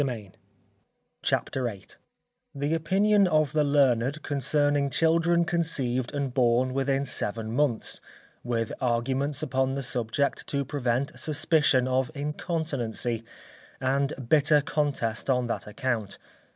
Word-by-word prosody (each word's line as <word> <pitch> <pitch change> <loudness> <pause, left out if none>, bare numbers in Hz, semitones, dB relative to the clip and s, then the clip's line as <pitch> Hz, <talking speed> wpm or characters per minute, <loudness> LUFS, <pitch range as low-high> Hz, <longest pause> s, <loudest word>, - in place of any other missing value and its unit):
CHAPTER 130 -1 -1
VIII 100 -5 -5 0.7
_The 145 +3 0
Opinion 195 +5 +3
of 155 -3 +2
the 155 -1 +3
Learned 140 -1 +2
concerning 145 0 +1
Children 170 +3 +2
conceived 135 -8 0
and 140 -3 -2
born 125 0 +2
within 135 +1 0
Seven 110 -3 -1
Months; 125 -2 0 0.4
with 115 -2 -2
Arguments 130 +4 0
upon 135 -2 0
the 140 - -3
Subject 125 +3 -1
to 140 -1 -1
prevent 130 -1 -2
Suspicion 150 -4 +2
of 130 0 +1
Incontinency, 140 -6 -2 0.6
and 135 +2 +1 0.2
bitter 150 +1 +4
Contest 140 -6 -1
on 125 -2 +2
that 120 - -4
Account. 110 -2 -3
140 Hz, 110 wpm, -27 LUFS, 125-150 Hz, 0.7 s, bitter